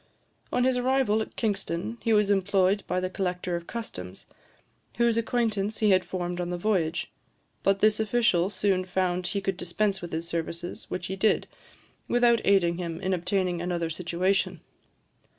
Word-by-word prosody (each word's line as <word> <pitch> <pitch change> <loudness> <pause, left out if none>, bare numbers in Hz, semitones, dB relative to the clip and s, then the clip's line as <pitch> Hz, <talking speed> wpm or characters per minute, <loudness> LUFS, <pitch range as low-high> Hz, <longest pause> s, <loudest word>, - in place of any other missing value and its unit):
On 250 - +2
his 255 0 +2
arrival 250 -4 +2
at - - -6
Kingston, 205 0 -2
he 230 - 0
was 210 -2 +4
employed 195 0 +2
by 180 - 0
the 185 - -1
collector 180 -1 -2
of 170 0 -5
customs, 95 - -7 0.7
whose 235 -1 +3
acquaintance 220 -3 0
he 215 -2 +3
had 185 -1 +4
formed 175 0 -3
on 175 - -3
the 180 - -2
voyage; 175 -4 0 0.5
but 195 0 +2
this 215 0 +4
official 215 -5 +2
soon 195 -3 +1
found 180 -1 -1
he 200 +2 -1
could 195 -1 -2
dispense 190 +3 -1
with 175 - -7
his 165 +1 -3
services, 170 +1 -4
which 180 0 -3
he 190 - -3
did, 210 +3 +2 0.6
without 240 -1 +4
aiding 180 -3 +3
him 170 -2 -4
in 190 +1 -1
obtaining 180 -1 0
another 175 -2 -2
situation. 180 +3 0
190 Hz, 165 wpm, -27 LUFS, 175-215 Hz, 0.7 s, was